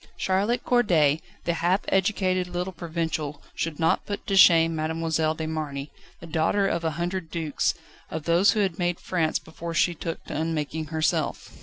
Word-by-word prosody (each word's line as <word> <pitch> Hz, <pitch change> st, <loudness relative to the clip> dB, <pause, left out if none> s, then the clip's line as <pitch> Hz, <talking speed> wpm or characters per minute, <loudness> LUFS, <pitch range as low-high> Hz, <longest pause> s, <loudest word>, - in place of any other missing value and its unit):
Charlotte 200 Hz, +6 st, +1 dB
Corday, 160 Hz, -, +3 dB, 0.2 s
the 170 Hz, -, 0 dB
half 175 Hz, +4 st, +1 dB
educated 185 Hz, -2 st, +1 dB
little 180 Hz, +1 st, -3 dB
provincial 160 Hz, -3 st, -3 dB
should 160 Hz, -2 st, -3 dB
not 165 Hz, 0 st, +2 dB
put 205 Hz, -1 st, -4 dB
to 195 Hz, -, 0 dB
shame 165 Hz, -3 st, +6 dB
Mademoiselle 160 Hz, 0 st, 0 dB
de 160 Hz, -, -4 dB
Marny, 150 Hz, -3 st, -4 dB, 0.3 s
the -, -, -10 dB
daughter 165 Hz, +5 st, +1 dB
of 170 Hz, -3 st, -1 dB
a 160 Hz, -1 st, -2 dB
hundred 175 Hz, 0 st, -3 dB
dukes, 160 Hz, -4 st, -1 dB, 0.3 s
of 160 Hz, -, -4 dB
those 170 Hz, +5 st, +4 dB
who 215 Hz, -, +1 dB
had 190 Hz, -4 st, -1 dB
made 175 Hz, -1 st, 0 dB
France 165 Hz, -4 st, 0 dB
before 165 Hz, +1 st, -7 dB
she 175 Hz, -, +3 dB
took 165 Hz, 0 st, -5 dB
to -, -, -6 dB
unmaking 160 Hz, 0 st, -2 dB
herself. 155 Hz, +1 st, -1 dB
165 Hz, 170 wpm, -26 LUFS, 160-185 Hz, 0.3 s, shame